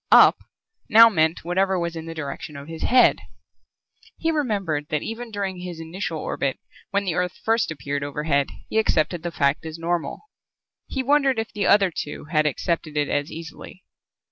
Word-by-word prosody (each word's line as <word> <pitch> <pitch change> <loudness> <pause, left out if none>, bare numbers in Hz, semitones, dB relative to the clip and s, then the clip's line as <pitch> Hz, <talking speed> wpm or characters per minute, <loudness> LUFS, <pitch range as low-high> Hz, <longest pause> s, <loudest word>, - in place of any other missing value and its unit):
"Up" - - +8 0.5
now 230 +2 +9
meant 160 -5 +1
whatever 190 +2 +1
was 170 -1 -2
in 165 0 -6
the 165 - -6
direction 145 -1 -6
of 140 +1 -9
his 165 0 -8
head. 250 +1 +5 1.0
He 325 - 0
remembered 200 - -1
that 150 - -1
even 230 +2 -5
during 195 -3 -3
his 180 -2 -7
initial 165 0 -4
orbit 140 -3 -2 0.3
when 200 0 0
the 180 - 0
Earth 180 0 -2
first 225 +1 +2
appeared 140 -1 -3
overhead 145 0 0 0.2
he 220 - +1
accepted 170 -5 +1
the 175 - -3
fact 140 -3 +1
as 160 0 -6
normal. 170 0 -2 0.7
He 265 - -2
wondered 275 -1 +3
if 225 0 -3
the 205 -1 0
other 195 -3 +5
two 150 - -5
had 155 -2 +3
accepted 155 +1 -2
it 145 -1 +1
as 145 +1 -1
easily. 165 +3 -10
170 Hz, 175 wpm, -23 LUFS, 155-205 Hz, 1.0 s, now